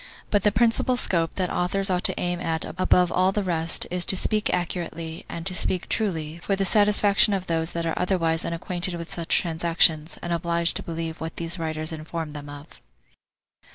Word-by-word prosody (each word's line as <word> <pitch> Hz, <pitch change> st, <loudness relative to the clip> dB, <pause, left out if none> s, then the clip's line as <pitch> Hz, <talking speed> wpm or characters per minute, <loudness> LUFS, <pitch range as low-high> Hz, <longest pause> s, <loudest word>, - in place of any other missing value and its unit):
But 205 Hz, -, +3 dB
the 210 Hz, -, +3 dB
principal 235 Hz, +3 st, +2 dB
scope 165 Hz, -8 st, 0 dB
that 185 Hz, -2 st, -1 dB
authors 195 Hz, +2 st, +1 dB
ought 180 Hz, 0 st, 0 dB
to -, -, +3 dB
aim 175 Hz, 0 st, -1 dB
at 165 Hz, -2 st, -2 dB
above 180 Hz, 0 st, +2 dB
all 185 Hz, +1 st, +3 dB
the 205 Hz, +1 st, -1 dB
rest, 165 Hz, -3 st, 0 dB
is 180 Hz, 0 st, +1 dB
to -, -, +3 dB
speak 215 Hz, +2 st, +1 dB
accurately, 170 Hz, -2 st, -4 dB
and 165 Hz, -1 st, -6 dB
to 190 Hz, -, +1 dB
speak 185 Hz, 0 st, +1 dB
truly, 165 Hz, -7 st, -2 dB
for 195 Hz, +3 st, -1 dB
the 195 Hz, 0 st, -1 dB
satisfaction 205 Hz, +1 st, +4 dB
of 190 Hz, -1 st, -3 dB
those 165 Hz, -1 st, -1 dB
that 170 Hz, 0 st, -2 dB
are 165 Hz, -, -1 dB
otherwise 170 Hz, -3 st, 0 dB
unacquainted 175 Hz, +1 st, -4 dB
with 170 Hz, -1 st, -7 dB
such 170 Hz, -1 st, +1 dB
transactions, 165 Hz, -1 st, +2 dB
and 175 Hz, -, -2 dB
obliged 170 Hz, 0 st, 0 dB
to -, -, -5 dB
believe 165 Hz, -1 st, -5 dB
what 160 Hz, 0 st, -5 dB
these 170 Hz, +1 st, -2 dB
writers 155 Hz, -1 st, -2 dB
inform 160 Hz, 0 st, -5 dB
them 145 Hz, -1 st, -8 dB
of. 145 Hz, +2 st, -12 dB
170 Hz, 190 wpm, -25 LUFS, 165-185 Hz, -, satisfaction